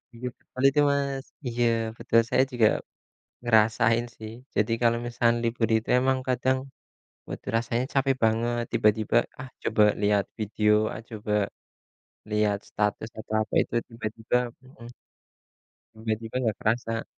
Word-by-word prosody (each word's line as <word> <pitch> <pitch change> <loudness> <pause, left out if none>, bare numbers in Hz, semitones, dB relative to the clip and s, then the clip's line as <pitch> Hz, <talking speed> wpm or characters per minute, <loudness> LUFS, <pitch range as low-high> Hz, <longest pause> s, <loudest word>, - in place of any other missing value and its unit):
Iya 125 +2 -5
betul 130 - -9
itu, 145 +2 0
Mas. 140 -1 -1 0.2
Iya 120 0 0 0.3
betul, 115 -1 +3
saya 130 - +4
juga 115 -3 +4 0.8
ngerasain 115 +1 +3
sih. 110 0 -8 0.2
Jadi 110 +2 +1
kalau 115 0 +3
misalkan 120 -1 +1
libur 115 0 0
itu 110 - -6
emang 130 0 +2
kadang 130 +1 +1 0.7
badan - - -6
rasanya 115 +1 -1
capek 135 -1 +2
banget 120 +2 +1
tiba-tiba, 105 0 +2 0.3
"Ah, 130 - -8
coba 105 - +1 0.2
lihat 100 -1 +2
video 105 0 +1 0.2
ah, - - -7
coba 105 -2 -6 1.0
lihat 105 -1 +2
status," 105 +2 -1
atau 110 - -7
apa - - -15
itu - - -7
tiba-tiba, 115 0 -4 0.3
hmm. 130 -3 -13 1.1
Tiba-tiba 110 +1 -4
nggak 110 -5 0
kerasa. 115 0 -1
115 Hz, 135 wpm, -26 LUFS, 110-125 Hz, 1.1 s, saya